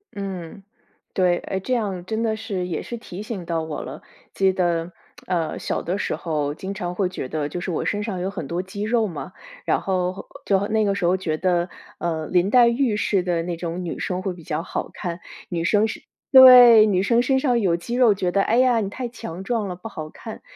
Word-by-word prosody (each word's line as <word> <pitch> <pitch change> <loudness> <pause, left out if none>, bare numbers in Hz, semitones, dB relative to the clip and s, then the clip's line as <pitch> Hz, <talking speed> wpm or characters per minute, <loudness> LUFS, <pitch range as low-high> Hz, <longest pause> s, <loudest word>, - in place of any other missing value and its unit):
嗯， 195 -1 -6 0.5
对， 180 -2 +2
诶 190 - -4
这 255 +7 -2
样 195 -6 -2
真 220 +2 -2
的 220 -1 0
是 205 -5 -4
也 165 - -3
是 235 - -6
提 200 -4 -9
醒 210 -5 -6
到 165 -1 -1
我 160 -1 -5
了， - - -8 0.3
记 190 -1 +2
得， 175 -1 -1 0.3
呃， 170 -3 -1
小 - - -2
的 180 +4 -2
时 - - -2
候 150 -3 -2
经 190 +3 -5
常 180 -2 -4
会 185 -2 0
觉 160 -8 -5
得 150 0 -3
就 175 - -5
是 180 0 -4
我 - - -2
身 205 0 -1
上 195 -5 -4
有 190 - -1
很 160 -7 -6
多 170 +3 -2
肌 200 +2 -6
肉 225 0 +2
嘛， 170 - -7 0.3
然 - - +1
后 185 0 -2 0.2
就 195 0 +2
那 220 -1 +1
个 200 0 +1
时 190 - -4
候 180 +2 +3
觉 160 -4 -2
得， 175 0 +1 0.3
呃， 160 -2 -2
林 180 +2 +2
黛 245 0 +6
玉 235 -3 +1
似 200 -2 +1
的 170 -2 0
那 175 -1 -4
种 175 +1 -4
女 170 - -5
生 185 0 -2
会 190 -1 -3
比 170 -2 -13
较 155 -1 -2
好 - - -4
看。 175 0 -5 0.3
女 170 -2 -2
生 210 +4 +3
是 - - -6 0.3
对。 250 -4 +10
女 190 -2 +2
生 235 +3 +3
身 265 +1 +2
上 250 -4 +2
有 180 -5 +2
肌 235 +8 -5
肉， 245 -4 +5
觉 185 -2 -1
得 195 - +2
唉 230 +4 +1
呀 250 -2 +4
你 200 -2 -2
太 245 +2 -5
强 190 -6 -8
壮 220 -1 -1
了 180 - -5
不 200 +5 -9
好 155 -5 -7
看。 220 +5 -10
190 Hz, 250 characters per minute, -23 LUFS, 175-220 Hz, 0.5 s, 对